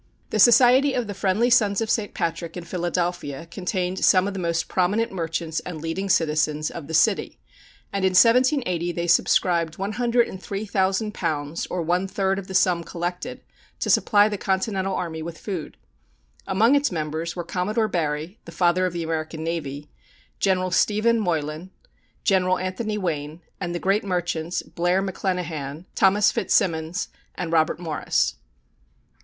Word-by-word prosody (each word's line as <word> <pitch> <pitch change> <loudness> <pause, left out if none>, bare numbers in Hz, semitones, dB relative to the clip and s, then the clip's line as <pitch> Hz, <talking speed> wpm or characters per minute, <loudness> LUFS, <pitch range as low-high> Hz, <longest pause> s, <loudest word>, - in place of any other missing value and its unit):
The 215 - 0
Society 250 +5 +6
of 245 - 0
the 205 - -5
Friendly 200 +5 +1
Sons 210 -5 +4
of 225 - -1
St. 210 -3 -1
Patrick 170 0 -3
in 175 - -6
Philadelphia 175 -4 -3
contained 180 +1 -3
some 185 0 +5
of 200 - -3
the 195 - -4
most 170 -2 -1
prominent 200 +5 +1
merchants 165 -2 -3
and 170 -3 -7
leading 165 +5 -3
citizens 155 -2 +1
of 165 -4 -8
the 160 - -2
city, 205 +5 +2 0.6
and 200 -1 -1
in 190 -1 +2
1780 230 - +3
they 170 0 -2
subscribed 170 -1 +2
£103,000, 195 -6 -1
or 180 -2 -2
one 180 +3 0
third 195 0 0
of 190 - -9
the 190 - -6
sum 180 -2 +3
collected, 175 +1 -5 0.4
to - - 0
supply 205 -1 +4
the 205 -2 -4
Continental 190 0 -1
army 160 -2 -4
with 165 +1 -6
food. 180 -7 -6 0.7
Among 215 +7 +3
its 285 -3 +2
members 160 0 -3
were 175 - -3
Commodore 205 +6 -1
Barry, 160 0 -2
the 170 - -9
Father 175 +2 +2
of 180 - -5
the 170 -1 -3
American 160 0 -3
Navy; 150 -3 -4 0.5
General 185 -2 +1
Stephen 215 +5 +2
Moylan; 160 -2 -2 0.5
General 185 -2 +2
Anthony 210 +4 -3
Wayne; 160 -4 -3 0.2
and 175 -2 -3
the - - -2
great 195 +4 +1
merchants, 175 -3 -2
Blair 175 +3 0
McClenachan, 175 -5 -3
Thomas 200 +1 +4
Fitzsimons, 165 -4 0 0.3
and 175 -2 -4
Robert 160 0 +2
Morris. 160 -4 -1
180 Hz, 150 wpm, -24 LUFS, 165-200 Hz, 0.7 s, Society